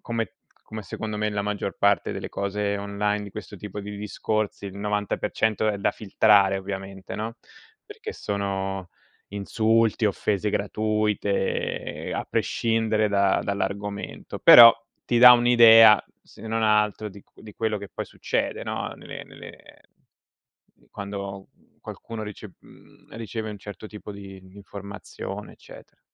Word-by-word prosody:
come 115 -1 -3 0.3
come 110 -1 -7
secondo 105 +3 -5
me 105 0 -1
la 105 -1 -2
maggior 105 -1 -3
parte 100 0 +2
delle - - -5
cose 100 +1 -2
online 105 +1 -2
di 100 - -9
questo 105 +1 -9
tipo 105 +1 -7
di 105 0 -7
discorsi, 105 0 -3
il 95 0 -8
90% 105 +1 -1
è 105 -1 -1
da 100 - +1
filtrare 100 -2 +3
ovviamente, 95 0 -7
no? 110 +2 -5 0.5
Perché - - -8
sono 95 -2 -3 0.4
insulti, 110 +2 +1
offese 105 0 0
gratuite, 105 -1 -1
ehm, - - -3
a - - -3
prescindere 110 -2 0
da 100 -1 +2
dall'argomento. 100 +1 -4
Però 115 -1 +10 0.3
ti 120 - +1
dà 125 +1 +11
un'idea, 115 -3 +7 0.2
se 110 - -13
non 110 0 -1
altro 105 0 +2
di 100 +1 -13
cu - - -21
di 110 - -11
quello 110 -1 -1
che 100 -1 -8
poi - - -4
succede, - - -3
no? - - -4
Nelle - - -9
nelle - - -12 1.3
quando 100 -1 -7 0.3
qualcuno 115 -1 -8
rice 105 -1 -9
mhmm, - - -19
riceve 110 -1 -5
un 105 - -8
certo 105 +1 -9
tipo 105 0 -10
di 95 -1 -11
di 95 - -18
informazione, 100 +1 -8
eccetera. - - -16
105 Hz, 140 wpm, -25 LUFS, 100-110 Hz, 1.3 s, dà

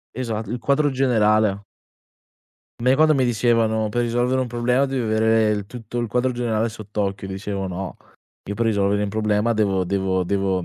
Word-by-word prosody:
Esa 115 -3 -3
il 120 +4 -4
quadro 145 +2 +2
generale. 110 -6 +2 1.2
A - - -7
me 130 +2 +4
quando 155 +1 +4
mi 130 - +2
dicevano: 115 -2 +1
"Per 120 +3 -1
risolvere 120 +2 +1
un 125 - -2
problema 125 +3 +1
devi 135 -1 -2
avere 110 -1 +2
tutto 115 +1 -8
il 120 - -1
quadro 125 +3 0
generale 115 -2 0
sott'occhio." 105 -3 -4
Dicevo: 95 0 -4
"No, 95 0 -5 0.5
io - - -1
per 115 +2 -1
risolvere 100 -2 +1
un 105 - 0
problema 110 +2 0
devo 100 -4 +1
devo 95 -1 0
devo 95 0 0
110 Hz, 170 wpm, -22 LUFS, 100-120 Hz, 1.2 s, me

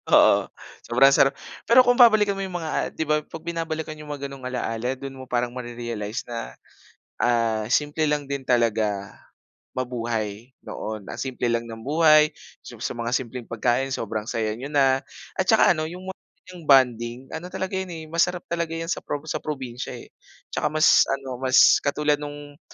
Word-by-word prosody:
Oo, - - +5 0.4
sobrang 135 +3 +5
sarap. 135 0 +5 0.3
Pero 255 +2 +8
kung 245 0 +4
babalikan 215 -4 +6
mo - - -3
yung 185 -2 -4
mga, 160 -1 -5
ah, - - 0
'di 160 - -3
ba 150 0 +2
'pag 160 +1 -10
binabalikan 160 -2 -4
yung 150 -1 -10
mga 140 -1 -4
gano'ng 135 -2 -10
alaala, 125 -1 -3
dun 135 0 -8
mo 130 - -8
parang 120 0 0
mare-realize 120 -3 -5
na, 115 - -6 0.7
ah, 115 -3 +1
simple 150 +1 +1
lang 145 -2 -1
din 140 -1 -3
talaga 110 -5 +1 0.6
mabuhay 120 -2 -3
noon. 110 -1 -6
Ang - - -6
simple 125 -2 -2
lang 115 0 0
ng 115 -1 -9
buhay, 155 +2 +5 0.3
sa - - -11
sa - - -3
mga 115 0 -3
simpleng 125 -2 -4
pagkain, 120 +4 0
sobrang 110 -3 -3
saya 110 -2 -1
niyo 130 +6 -7
na 135 -2 +3 0.3
at - - -1
tsaka - - +6
ano, 155 0 -3
yung 185 +2 -8
mga - - -4 0.5
bonding, 125 -1 +3
ano 165 +3 -6
talaga 190 +1 -4
yun 190 - -4
eh, 165 -2 -7
masarap 170 +2 0
talaga 170 -1 -2
yan 165 +1 -3
sa - - -1
prob 145 +1 -5
sa - - -3
probinsya 130 -5 -5
eh, - - -12 0.4
tsaka - - 0
mas 155 +1 +5
ano, 135 -2 -3
mas 130 -1 +6
katulad 150 +1 +1
nung 145 0 -9
135 Hz, 180 wpm, -24 LUFS, 120-155 Hz, 0.7 s, Pero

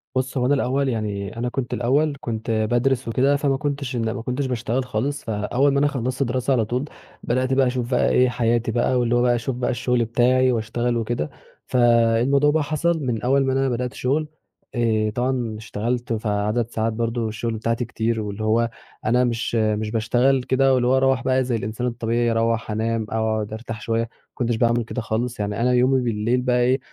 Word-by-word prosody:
بُص، 130 +1 -1
هو 125 - +1
أنا 140 - +3
الأول 135 0 +1
يعني، 105 -1 -3
أنا 120 +1 -1
كنت 125 -1 -3
الأول 140 +4 +1
كنت 115 -1 -3
بادرس 120 +3 +1
وكده، 135 +5 +2
فما 140 -2 +1
كنتش 140 -3 -3
إن 115 -1 -1
باشتغل 125 -1 -1
خالص 135 +5 -2
فأول 120 +6 +1
ما 140 - +2
أنا 145 - +3
خلصت 130 -1 -1
دراسة، 130 +2 0
على 115 -4 +2
طول 125 +5 -2 0.4
بدأت 130 +2 0
بقى 135 -1 +3
أشوف 125 0 -2
بقى 125 - +3
إيه 125 0 +4
حياتي 115 -1 0
بقى، 125 +2 +1
واللي 120 0 +1
هو 120 - +3
بقى 120 -1 +3
أشوف 120 +2 -3
بقى 125 0 -1
الشغل 125 0 0
بتاعي، 125 +3 +3
واشتغل 120 +1 -1
وكده، 115 -9 -2 0.4
فالموضوع 120 +4 +3
بقى 160 0 +1
حصل 160 +3 0
من 115 -3 -1
أول 135 +2 +2
ما 130 - +1
أنا 135 0 +1
بدأت 125 0 -2
شغل 145 +5 -1 0.5
آآ 110 -2 +1
طبعًا 120 -1 -2
اشتغلت، 120 +3 -3
فعدد 105 +1 -1
ساعات 110 -1 -1
برضه 115 0 -1
الشغل 110 +1 -3
بتاعتي 115 +2 -1
كتير، 115 -1 -1
واللي 105 +1 -5
هو 115 +2 +2 0.4
أنا 125 +3 +3
مش 120 -1 -1
مش 110 -1 0
باشتغل 125 +4 +2
كده 135 +1 +3
واللي 125 -1 +2
هو 130 - +4
أروّح 135 -2 +2
بقى 130 0 +2
زي 125 -1 -1
الإنسان 110 +3 -3
الطبيعي، 120 0 0
أروّح 115 -1 0
أنام 110 +1 -1
أقعد 110 -1 -1
أرتاح 110 -1 -6
شوية، 115 +1 0
ما 115 - -3 0.3
كنتش 120 -2 -1
بعمل 120 +1 +2
كده 125 +2 -4
خالص 115 +2 -2
يعني 105 +1 -2
أنا 125 +1 +3
يومي 130 +1 +3
بالليل 115 +1 0
بقي 125 -1 +1
إيه 130 +2 +2
120 Hz, 195 wpm, -22 LUFS, 115-130 Hz, 0.5 s, إيه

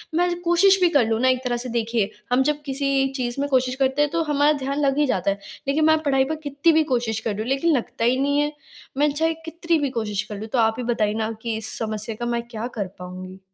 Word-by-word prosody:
मैं 350 +1 +1
कोशिश 360 +3 +4
भी 355 - +5
कर 285 -8 +3
लूँ 225 0 0
ना 260 - +4
एक 255 0 +1
तरह 245 -1 -1
से 250 +1 -5
देखिए 230 -3 0 0.2
हम 255 +2 +4
जब 295 0 -7
किसी 275 -1 +1
चीज़ 245 0 -3
में 285 - -1
कोशिश 255 -1 +1
करते 265 +1 +1
हैं 295 -1 +2
तो 335 0 0
हमारा 295 -1 +3
ध्यान 275 +2 -2
लग 275 0 +1
ही 295 - +4
जाता 200 -7 +1
है 200 - -4 0.3
लेकिन 300 +3 +2
मैं 315 0 +5
पढ़ाई 270 -3 +3
पर - - 0
कितनी 285 +3 +2
भी 315 0 +4
कोशिश 230 -3 0
कर 225 0 -2
रही 200 - -7
हूँ 225 - -4
लेकिन 275 +5 +2
लगता 230 -1 -3
ही 250 +2 +3
नहीं 285 +1 +2
है। 295 0 +1 0.5
मैं 295 +1 +3
चाहे 320 +3 +1
कितनी 335 0 0
भी 285 -2 0
कोशिश 210 -2 -2
कर 205 - -4
लूँ। 220 - -6
तो 255 - +2
आप 225 -1 +3
ही 250 - -3
बताइए 210 -2 0
ना 220 0 -2
कि 230 -1 -2
इस 220 +2 -5
समस्या 215 0 -4
का 240 - -2
मैं 235 0 -1
क्या 230 0 -5
कर 200 -3 -1
पाऊँगी? 185 +1 -8
260 Hz, 265 wpm, -23 LUFS, 225-295 Hz, 0.5 s, भी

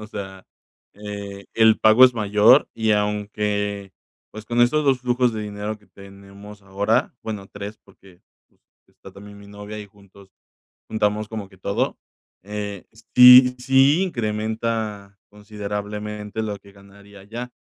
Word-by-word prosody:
O 105 - -9
sea, 95 -3 -9 0.5
eh, 100 -1 -8
el 110 -1 +4
pago 110 +4 +6
es 125 -1 +4
mayor, 105 +4 +4
y 110 -1 0
aunque, 105 -1 -2 0.4
pues, 110 0 -10
con 120 +2 -1
estos 145 +5 +3
2 135 -2 +2
flujos 125 -1 +1
de 110 -1 -5
dinero 105 +1 -6
que 105 - -26
tenemos 100 +1 -14
ahora, 100 +3 -1
bueno, 105 -3 -7
3 100 +1 -9
porque, 95 -2 -21 0.3
pues, - - -38 0.3
está - - -16
también 100 +1 -13
mi 100 - -14
novia, 105 +1 -9
y 105 - -10
juntos 100 -1 -20 0.6
juntamos 105 0 -1
como 105 -3 -7
que 95 - -20
todo, 100 +2 -2 0.5
eh, 105 -1 -6 0.3
sí 125 0 +9
sí 135 +6 +3
incrementa 110 - -3
considerablemente 105 0 -6
lo 105 -1 -4
que 100 0 -19
ganaría 100 0 -17
allá. 120 +5 -8
105 Hz, 145 wpm, -22 LUFS, 100-110 Hz, 0.6 s, sí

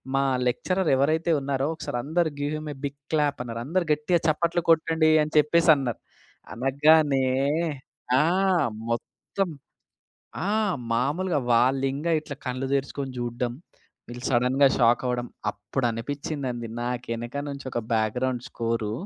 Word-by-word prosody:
మా 135 - +3 0.2
లెక్చరర్ 185 +8 0
ఎవరైతే 160 +5 +2
ఉన్నారో 135 0 -1
ఒకసారి 140 - -5
అందరూ 160 +2 +1
"give 145 +1 -1
him 155 0 -6
a - - -14
big 140 0 -6
clap" 150 -3 +1
అన్నారు. 115 -1 -5
"అందరూ 180 +5 0
గట్టిగా 160 +4 +1
చప్పట్లు 170 +2 +1
కొట్టండి" 160 0 +4
అని 155 - -6
చెప్పేసి 165 +3 +4
అన్నారు. 130 -5 -3 0.5
అనగానే 140 +2 +3 1.0
ఆ! - - +4 0.7
మొత్తం 180 +9 -3 1.0
ఆ! - - 0 0.5
మామూలుగా 155 +6 0
వాళ్ళు 130 +3 +3
ఇంగా 155 +5 -2
ఇట్లా 145 -2 -8
కళ్ళు 130 +1 -2
తెరుచుకొని 135 0 -2
చూడడం. 120 0 -2 0.6
వీళ్ళు 120 +1 -8
సడెన్‌గా 130 +3 +4
షాక్ 120 -1 +4
అవ్వడం. 125 -1 -1 0.2
అప్పుడు 105 +5 -3
అనిపించిందండి. 130 0 -4 0.2
నాకు 125 +1 -3
వెనక 120 +3 -5
నుంచి 140 0 -7
ఒక 120 - -1
బ్యాగ్రౌండ్ 120 +3 0
స్కోరు 115 -2 -2
135 Hz, 130 wpm, -25 LUFS, 120-155 Hz, 1.0 s, కొట్టండి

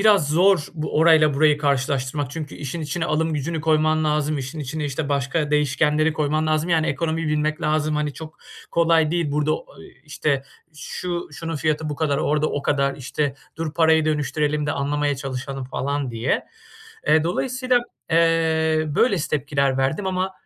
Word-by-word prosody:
biraz 200 -8 +4
zor 175 +1 +3
bu 155 -1 -3
orayla 155 -2 +5
burayı 150 +1 +4
karşılaştırmak 140 -1 -1
çünkü 155 -1 -6
işin 145 +4 -5
içine 155 +3 -2
alım 160 +1 0
gücünü 155 +3 -2
koyman 155 0 +2
lazım, 150 0 0
işin 140 +4 -5
içine, 150 +2 -4
işte, 145 +1 -3
başka 140 +2 0
değişkenleri 150 +2 +2
koyman 155 0 0
lazım. 155 +2 +1
Yani 160 -1 +3
ekonomiyi 160 +1 -1
bilmek 150 +1 0
lazım, 155 0 +1
hani, 150 -1 -1
çok 155 +2 -10 0.3
kolay 165 -2 +3
değil. 165 -4 -1
Burada 150 +1 +1
o - - -12 0.2
i 130 - -17
işte, 145 -2 -1 0.3
"Şu 175 +4 -5
şunun 165 +1 -5
fiyatı 155 +1 -1
bu 145 - -4
kadar, 145 -2 0
orada 150 0 +1
o 145 - -3
kadar, 140 -1 +1
işte, 140 +1 -2 0.2
dur 160 -1 -4
parayı 160 -1 +4
dönüştürelim 150 0 0
de 145 - 0
anlamaya 145 0 -1
çalışalım." 135 0 -5
falan 140 +1 -2
diye. 115 +2 -1 0.6
Eee, 155 +1 +4
dolayısıyla, 255 +7 +1 0.3
eee, 160 -1 +2
böylesi 170 - +1
tepkiler 140 -2 0
verdim 145 +9 0
ama 185 0 -1
150 Hz, 165 wpm, -22 LUFS, 145-160 Hz, 0.6 s, orayla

